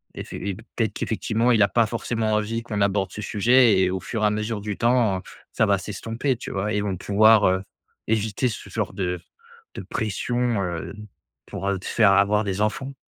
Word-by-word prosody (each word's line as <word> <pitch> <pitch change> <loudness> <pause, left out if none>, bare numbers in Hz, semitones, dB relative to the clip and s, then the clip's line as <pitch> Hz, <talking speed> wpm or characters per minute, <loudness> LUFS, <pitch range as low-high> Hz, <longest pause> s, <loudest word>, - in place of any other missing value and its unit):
Effe - - -8
et 100 -1 -4
peut-être 115 0 -3
qu'effectivement, 110 +3 0
il 110 -3 +4
a 100 - +4
pas 115 +3 +3
forcément 115 -1 -2
envie 105 +2 -1
qu'on 105 -3 -3
aborde 100 -2 +1
ce 105 - -7
sujet» 115 0 +4
et 95 - +3
au 95 - -2
fur 110 -2 -3
et - - +5
à - - +3
mesure 105 0 -3
du 105 -1 -4
temps, 115 -6 +2 0.3
ça - - +3
va 100 - +3
s'estomper, 115 +6 -3
tu - - -7
vois? 100 +2 -2
Et - - 0
ils 105 - 0
vont 100 -2 -2
pouvoir, 105 +2 +5
heu, 95 +1 +1 0.4
éviter 110 +2 0
ce 110 - -8
genre 105 -5 -3
de 90 -3 -2 0.6
de - - -5
pression, 115 +1 -1
heu, 85 -3 -4 0.5
pour 100 - -4
te - - -12
faire 105 -4 +4
avoir 100 +2 +3
des 100 +1 -2
enfants. 135 +6 -2
105 Hz, 200 wpm, -24 LUFS, 100-115 Hz, 0.6 s, et